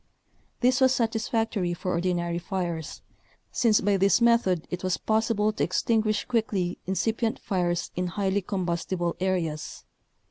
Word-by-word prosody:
This 255 +1 +3
was 260 0 +5
satisfactory 225 -5 0
for 180 +1 -3
ordinary 175 -1 -1
fires, 170 -3 -4 0.5
since 225 -4 +3
by 200 0 +2
this 195 +3 +4
method 230 -8 +3
it 180 +1 -4
was 185 -1 0
possible 220 -1 +1
to - - -1
extinguish 215 +3 +1
quickly 210 -7 -1
incipient 225 +4 0
fires 175 -2 -1
in 180 0 -1
highly 195 +2 0
combustible 175 -2 -2
areas. 175 -5 -2
190 Hz, 130 wpm, -26 LUFS, 175-220 Hz, 0.5 s, was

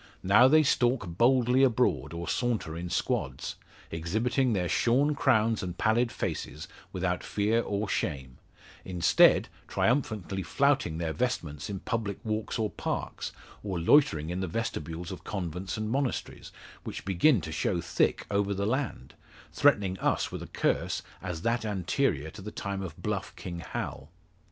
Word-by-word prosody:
Now 105 +7 +7
they 155 +3 +6
stalk 120 -4 +2
boldly 125 +3 +4
abroad, 110 - +2
or 85 +1 -5
saunter 115 -10 -1
in 85 +1 -5
squads, - - -2 0.4
exhibiting 110 +10 0
their 90 -3 0
shorn 135 - +3
crowns 115 -6 +2
and 90 -2 -5
pallid 115 +2 +2
faces, 75 -6 -4 0.2
without 90 -1 -1
fear 105 +3 +1
or 105 -1 -2
shame; 65 -9 -3 0.4
instead, 90 -2 +4 0.2
triumphantly 110 -7 0
flouting 135 - +1
their 80 -1 -2
vestments 85 - -2
in 95 -2 -4
public 110 -3 -2
walks 110 +1 -2
or 110 -2 -1
parks, - - -4 0.3
or 95 -3 -3
loitering 80 - +4
in 90 - -2
the 95 - -2
vestibules 85 -4 -4
of 95 -1 -8
convents 90 -1 -4
and 110 0 -2
monasteries, 135 0 -2 0.3
which - - -6
begin 100 - +4
to 80 - -6
show 85 +2 0
thick 85 -1 +1
over 100 0 +1
the 100 +1 -1
land 115 - -2 0.4
threatening 95 -2 +3
us - - 0
with - - -5
a - - -7
curse - - 0 0.2
as 90 -3 -5
that 115 0 +1
anterior 90 -7 0
to - - -10
the 105 - -6
time 100 -2 -4
of 85 -5 -6
bluff - - -3
King 85 -1 -6
Hal. 75 -2 -5
100 Hz, 150 wpm, -29 LUFS, 85-115 Hz, 0.4 s, Now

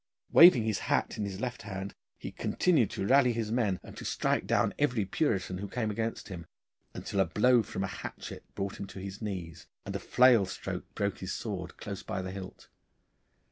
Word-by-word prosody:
Waving 165 -9 +9
his 110 -2 0
hat - - +1
in 105 - 0
his 95 -1 -5
left 125 +1 -3
hand 95 -1 -6 0.2
he - - -7
continued 155 - +2
to 95 - -3
rally 130 +1 +5
his 110 -2 -2
men, 110 -6 +1
and - - -11
to - - -7
strike - - 0
down - - +2
every 125 -8 +2
Puritan 95 - -1
who 100 - -4
came 110 0 -2
against 110 +1 -3
him, 85 -3 -7 0.5
until 100 - -3
a 95 - +5
blow 120 +8 +4
from 95 -2 -4
a 95 -1 -4
hatchet - - -7
brought 100 0 -4
him 100 - -5
on 95 - -6
his 100 +2 -7
knees 90 -6 -5 0.2
and - - -5
a - - -1
flail 120 -6 +5
stroke 95 - -6
broke 100 -1 -1
his 95 0 -4
sword 95 -5 -5
close 100 -2 -6
by 95 - -4
the 95 - -5
hilt. 95 -1 -9
100 Hz, 200 wpm, -30 LUFS, 95-115 Hz, 0.5 s, Waving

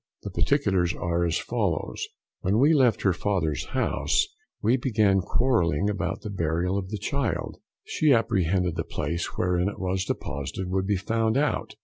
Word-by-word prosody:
The - - -5
particulars 95 -12 +1
are 85 0 -1
as 85 - +1
follows: - - -2 0.3
When 100 +3 +1
we 145 +6 +5
left 130 -7 +3
her 95 - +4
father's 85 -7 -1
house, - - +1 0.3
we 115 +4 +3
began 110 -6 +2
quarrelling 100 - +1
about 100 0 -3
the 105 -2 -6
burial 85 0 0
of 95 -2 -3
the 105 - -3
child: 140 +4 -2 0.3
she 155 -2 +2
apprehended 90 -6 +2
the 80 - 0
place 85 +3 -3
wherein 90 +1 +1
it - - -8
was 95 0 -1
deposited 90 +7 -4
would 95 0 0
be 100 -1 +2
found 115 +4 0
out. 145 0 -1
95 Hz, 160 wpm, -26 LUFS, 90-110 Hz, 0.3 s, we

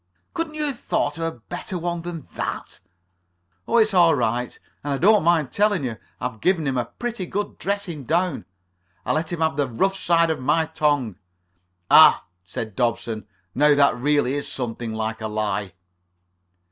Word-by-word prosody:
"Couldn't 330 -2 -3
you 305 - -1
have 275 -5 -3
thought 145 +2 -1
of - - -2
a 165 -7 -4
better 185 - -6
one 175 0 -3
than 165 -4 -7
that?" - - -5 0.9
"Oh, - - +2
it's 220 -2 +4
all 170 -3 +5
right. 120 +2 -1 0.3
And 145 0 -1
I - - 0
don't 205 +5 +5
mind 160 -5 +2
telling 205 -6 +2
you 120 -4 -3 0.2
I've 125 -3 -5
given 175 -1 +2
him 135 -2 0
a 120 -1 0
pretty 235 - -5
good 205 +3 -4
dressing 185 -8 -3
down. 170 - 0 0.6
I - - 0
let 160 +1 -1
him 170 -2 -3
have 160 -3 +1
the 145 -2 +1
rough 190 +12 0
side 170 -3 +2
of 160 - -2
my 160 +5 +2
tongue." 145 - 0 0.7
"Ah," - - +8 0.2
said 95 +4 -6
Dobson, 115 -3 -1 0.3
"now 150 +2 +4
that 140 -2 +4
really 140 +1 +1
is 145 0 -3
something 120 -2 -4
like 110 0 -3
a 110 - -2
lie." 105 -3 -2
150 Hz, 175 wpm, -23 LUFS, 120-175 Hz, 0.9 s, Ah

